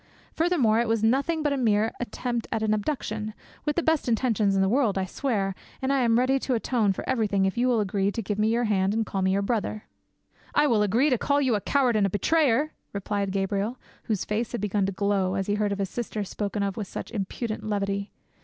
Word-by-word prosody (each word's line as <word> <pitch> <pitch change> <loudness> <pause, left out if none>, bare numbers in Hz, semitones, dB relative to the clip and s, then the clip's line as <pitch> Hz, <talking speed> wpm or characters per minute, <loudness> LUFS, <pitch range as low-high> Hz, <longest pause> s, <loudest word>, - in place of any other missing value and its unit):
Furthermore, 300 -10 +2
it 235 - +1
was 225 -1 +1
nothing 280 +8 +2
but 295 -2 +1
a - - -1
mere 220 -3 +2
attempt 240 0 -3
at 220 -1 -1
an 215 -1 +2
abduction, 215 -2 -3 0.3
with 295 - 0
the 345 - +1
best 320 -5 +1
intentions 220 -4 +2
in 195 - +3
the - - +2
world, 225 -2 +2
I 190 - 0
swear, 195 -2 -1 0.3
and 265 +1 0
I 275 - +2
am 230 -2 +3
ready 260 +2 +3
to 260 -1 -1
atone 225 -3 +1
for 190 - -5
everything 210 -6 +1
if 190 - 0
you 245 +2 +2
will 245 -3 +3
agree 200 -1 0
to 230 - -2
give 205 +1 -3
me 215 - +3
your 235 +2 +2
hand 200 -2 +1
and 225 0 +1
call 195 -1 -3
me 190 0 +2
your 200 +1 +1
brother." 215 -1 -2 0.7
"I 295 - +5
will 230 -7 +3
agree 230 +8 +3
to 250 - +2
call 285 0 +2
you 260 -4 +2
a 205 - 0
coward 255 -2 +2
and 205 -2 +3
a - - -3
betrayer!" 290 - +2 0.2
replied 200 0 -2
Gabriel, 200 +4 -1 0.3
whose 215 -4 -1
face 220 +3 -2
had 240 - -2
begun 205 -1 0
to - - -1
glow, 195 -1 0
as 195 0 -1
he 205 - 0
heard 210 0 0
his 195 -1 -1
sister 220 -3 -3
spoken 200 +1 -3
of 195 -1 -2
with 210 -3 -3
such - - -7
impudent 215 +1 -4
levity. 200 -1 -2
215 Hz, 235 wpm, -26 LUFS, 200-245 Hz, 0.7 s, I